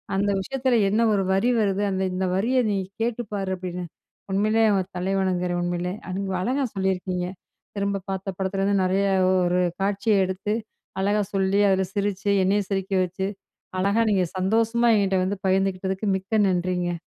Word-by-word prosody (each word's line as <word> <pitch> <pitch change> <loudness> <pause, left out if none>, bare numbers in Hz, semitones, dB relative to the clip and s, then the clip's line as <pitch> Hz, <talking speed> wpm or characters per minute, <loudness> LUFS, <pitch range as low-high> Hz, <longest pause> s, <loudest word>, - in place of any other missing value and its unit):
அந்த 200 +1 +1
விஷயத்தில 250 +4 0
என்ன 215 +3 +2
ஒரு 195 -1 +2
வரி 195 +6 +2
வருது 200 -1 +1
அந்த 190 0 -1
இந்த 185 +1 -1
வரிய 235 +7 +1
நீ 200 - +1 0.2
கேட்டுப்பாரு. 210 -4 -2
அப்டின்னு 180 -1 -5 0.5
உண்மையிலே 215 +3 +2
ஒரு 185 -1 -1
தலைவணுங்கிறேன் 180 -1 0
உண்மையிலே 175 +1 -2
அது 185 - -4
நீங்க 195 -1 -2
அழகா 265 +6 0
சொல்லியிருக்கீங்க. 185 -1 -1 0.5
திரும்ப 200 -1 -1
பார்த்த 195 0 -3
படத்துலருந்து 195 +1 0
நறைய 190 +2 +1 0.4
ஒரு 175 +1 +1 0.2
காட்சிய 200 0 +2
எடுத்து, 190 +3 -2 0.5
அழகா 205 +2 +2
சொல்லி, 195 0 +2
அதில 190 0 +2
சிரிச்சு, 200 0 -1
என்னயும் 195 +1 +1
சிரிக்க 195 -1 -2
வச்சு, 185 +2 -3 0.5
அழகா 200 +4 +2
நீங்க 190 -3 +3
சந்தோஷமா 225 +5 +2
என்ட்ட 195 -1 +1
வந்து 200 +2 -2
பகிர்ந்துகிட்டதுக்கு 190 +1 0
மிக்க 195 +3 -1
நன்றிங்க. 180 -1 -1
195 Hz, 145 wpm, -24 LUFS, 185-205 Hz, 0.5 s, நீங்க